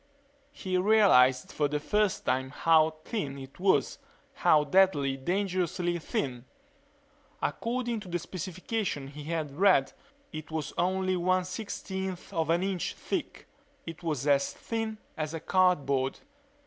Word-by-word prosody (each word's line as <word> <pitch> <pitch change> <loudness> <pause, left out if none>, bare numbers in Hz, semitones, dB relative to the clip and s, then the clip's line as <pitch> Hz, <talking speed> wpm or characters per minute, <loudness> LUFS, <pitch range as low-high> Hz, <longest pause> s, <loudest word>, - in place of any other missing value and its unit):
He 185 -9 -2
realized 180 -12 +5
for 150 - +1
the 150 +1 -2
first 210 +5 0
time 130 +1 0
how 160 +2 +3
thin 145 -11 -3
it 135 +2 -11
was 185 -8 +2 0.3
how 150 -1 +4
deadly, 145 -4 +3
dangerously 175 +2 -1
thin. 125 -5 -3 0.9
According 240 -1 -2
to 205 - -11
the 175 0 -1
specifications 180 -3 -4
he 150 0 -8
had 155 -3 -3
read 180 -6 +4 0.4
it 155 0 -7
was 160 -2 -4
only 185 +1 +1
one 185 +1 +1
sixteenth 190 -1 -5
of 160 -1 0
an 170 +2 +2
inch 190 -2 -2
thick. - - -4 0.4
It 165 0 -8
was 150 -6 -2
as 140 -1 +3
thin 225 -1 -4 0.2
as 155 0 -3
cardboard. 140 -8 +2
170 Hz, 130 wpm, -29 LUFS, 145-190 Hz, 0.9 s, realized